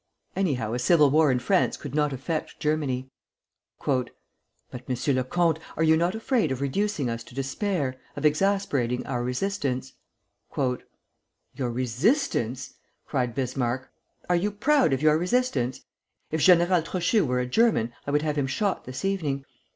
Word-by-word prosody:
"Anyhow, 130 - 0
a 120 - -1
civil 150 +1 +4
war 155 -1 +4
in 125 - +2
France 180 +10 +1
could 145 -3 -8
not 150 -1 +1
affect 150 +4 -4
Germany." 140 -4 -1 0.7
"But, 130 -3 +1 0.6
M. 125 +2 -1
le 130 - +1
Comte, 165 +3 +1 0.2
are 160 - +2
you 160 0 +5
not 170 +5 +1
afraid 225 - +1
of 130 - -2
reducing 145 +2 -1
us 115 0 -3
to - - -14
despair, 135 - -2 0.2
of - - -3
exasperating 150 -7 +1
our 125 -2 -2
resistance?" 130 -2 -2 0.6
"Your 125 -1 -5
resistance!" 130 - 0 0.3
cried 125 -5 -1
Bismarck. 130 -1 -2 0.4
"Are 180 - +3
you 185 +4 +1
proud 265 - +2
of 135 +2 0
your 155 0 +5
resistance? 180 - 0 0.5
If 160 0 -1
General 175 0 +5
Trochu 185 +5 +1
were 125 -2 0
a 125 - 0
German, 125 - +2
I - - -1
would 150 +1 +1
have 150 -1 0
him 135 - 0
shot 195 +7 -1
this 130 +6 -5
evening. 150 -9 -1
145 Hz, 150 wpm, -26 LUFS, 130-180 Hz, 0.7 s, you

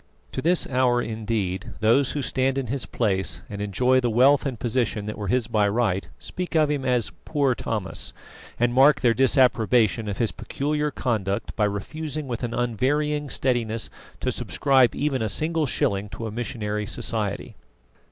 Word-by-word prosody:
To - - -3
this 175 +4 +3
hour, 125 -2 +2
indeed, 110 -5 -3
those 115 +6 +3
who 145 - -2
stand 130 +2 0
in 135 - -1
his 140 - -2
place 95 -4 -1
and 100 0 -5
enjoy 125 +6 +2
the 120 -2 0
wealth 130 +5 +4
and 125 -5 -5
position 115 -3 -1
that 105 - -4
were 105 -2 -5
his 125 +3 +1
by 110 -3 +1
right, 100 -3 0
speak 180 -1 -5
of 155 -2 +3
him 145 -2 -1
as 125 -3 +1
"poor 140 -4 +1
Thomas," 105 -5 -2 0.5
and 120 0 +2
mark 135 +3 +5
their 120 -3 +4
disapprobation 120 - +3
of 100 - -4
his 115 - +1
peculiar 150 +1 -2
conduct 105 -8 -2
by 105 - +2
refusing 145 +9 -4
with 120 -3 -4
an 120 -1 -3
unvarying 145 +5 0
steadiness 115 -4 -1 0.3
to - - 0
subscribe 135 -3 +2
even 140 -3 -1
a 110 - 0
single 160 +4 +1
shilling 100 -4 0
to 115 - -6
a 110 - -4
missionary 105 -2 -3
society. - - -1
120 Hz, 170 wpm, -24 LUFS, 110-135 Hz, 0.5 s, mark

